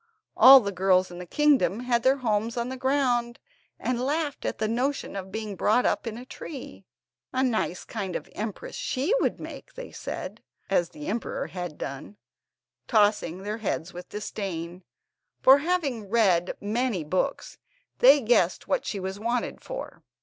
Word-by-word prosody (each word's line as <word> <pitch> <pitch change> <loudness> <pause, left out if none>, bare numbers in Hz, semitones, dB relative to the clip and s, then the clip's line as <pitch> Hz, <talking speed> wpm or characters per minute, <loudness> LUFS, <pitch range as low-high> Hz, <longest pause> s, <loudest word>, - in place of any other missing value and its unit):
All 265 0 +10
the 200 -2 -3
girls 185 -1 +2
in 175 - -8
the 180 - -8
kingdom 275 - +3
had 245 -1 +1
their 260 +2 +4
homes 230 -1 -1
on 235 +1 -1
the 260 - -4
ground, 255 -3 +1 0.4
and 245 -1 -1
laughed 290 +2 -2
at - - -2
the 215 +1 0
notion 255 +4 -1
of 190 -1 -6
being 215 -1 -4
brought 220 +6 +2
up - - 0
in 225 0 -4
a 245 - -9
tree. 270 +1 -9 0.5
"A 260 0 +1
nice 220 -7 -1
kind 195 -5 -4
of - - -4
empress 210 -1 -5
she 280 - -1
would - - 0
make," - - -9
they - - -8
said, - - -6 0.3
as 175 -3 +2
the 150 - -10
emperor 225 +3 -3
had 175 -4 -6
done, 140 +9 -7 0.7
tossing 205 -5 +2
their 210 +2 -3
heads 190 -4 -3
with 180 +1 -9
disdain; 185 -4 -5 0.6
for, 270 +2 +7
having 285 - -1
read 190 -6 +2
many 220 -3 -1
books, 185 - -2 0.4
they 275 +3 +7
guessed 215 -7 +2
what 275 - 0
she 200 - -3
was 190 +1 -5
wanted 235 +2 -2
for. - - -7
220 Hz, 165 wpm, -26 LUFS, 190-255 Hz, 0.7 s, All